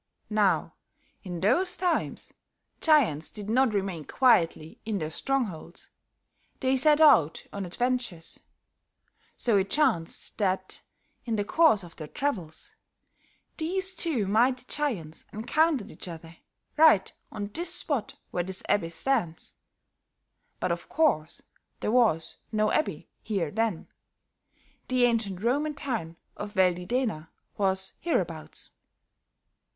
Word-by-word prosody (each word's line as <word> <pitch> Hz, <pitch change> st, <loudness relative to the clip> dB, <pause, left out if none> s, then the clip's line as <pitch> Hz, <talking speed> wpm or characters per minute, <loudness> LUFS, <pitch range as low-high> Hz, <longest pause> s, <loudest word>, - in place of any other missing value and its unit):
Now, 210 Hz, -3 st, +2 dB, 0.5 s
in 175 Hz, -4 st, -6 dB
those 355 Hz, -, +2 dB
times, 355 Hz, 0 st, -1 dB, 0.5 s
giants 245 Hz, -, +3 dB
did 210 Hz, 0 st, -6 dB
not 250 Hz, -2 st, +3 dB
remain 190 Hz, -6 st, -2 dB
quietly 165 Hz, -, +2 dB
in 215 Hz, -2 st, -2 dB
their 155 Hz, -3 st, -3 dB
strongholds; 205 Hz, -, -3 dB, 0.7 s
they 260 Hz, 0 st, +2 dB
set 295 Hz, +3 st, +4 dB
out 170 Hz, -, +5 dB
on 200 Hz, -2 st, -4 dB
adventures; 240 Hz, -5 st, -2 dB, 1.0 s
so 230 Hz, -4 st, +2 dB
it 195 Hz, 0 st, +1 dB
chanced 230 Hz, -, 0 dB
that, 190 Hz, -2 st, -1 dB, 0.4 s
in 230 Hz, -2 st, -1 dB
the 205 Hz, -1 st, -1 dB
course 310 Hz, -, +4 dB
of 170 Hz, -1 st, -13 dB
their 155 Hz, -, -7 dB
travels, 190 Hz, -, -4 dB, 0.8 s
these 375 Hz, +4 st, -1 dB
two 305 Hz, -, 0 dB
mighty 245 Hz, +5 st, +2 dB
giants 205 Hz, -, -3 dB
encountered 245 Hz, +1 st, +1 dB
each -, -, -8 dB
other, 165 Hz, -1 st, -9 dB, 0.4 s
right 305 Hz, -12 st, +6 dB, 0.2 s
on 205 Hz, 0 st, -5 dB
this 345 Hz, +1 st, -2 dB
spot 285 Hz, -10 st, -1 dB, 0.2 s
where 175 Hz, -, 0 dB
this 190 Hz, +1 st, -5 dB
abbey 190 Hz, -5 st, +1 dB
stands. 170 Hz, -1 st, -1 dB, 1.1 s
But 180 Hz, -, 0 dB
of 170 Hz, 0 st, -4 dB
course, 270 Hz, -, +1 dB, 0.4 s
there -, -, -1 dB
was 220 Hz, -10 st, +2 dB
no 215 Hz, -1 st, +2 dB
abbey 170 Hz, -6 st, -1 dB
here 195 Hz, -8 st, -2 dB
then; 220 Hz, -5 st, -1 dB, 1.0 s
the 255 Hz, -1 st, +2 dB
ancient 220 Hz, -5 st, +1 dB
Roman 290 Hz, +5 st, +1 dB
town 230 Hz, -, -4 dB, 0.2 s
of 205 Hz, +1 st, -6 dB
Veldidena 180 Hz, -1 st, +1 dB, 0.3 s
was 190 Hz, -1 st, -1 dB
hereabouts. 170 Hz, -, -2 dB
210 Hz, 120 wpm, -28 LUFS, 175-265 Hz, 1.1 s, right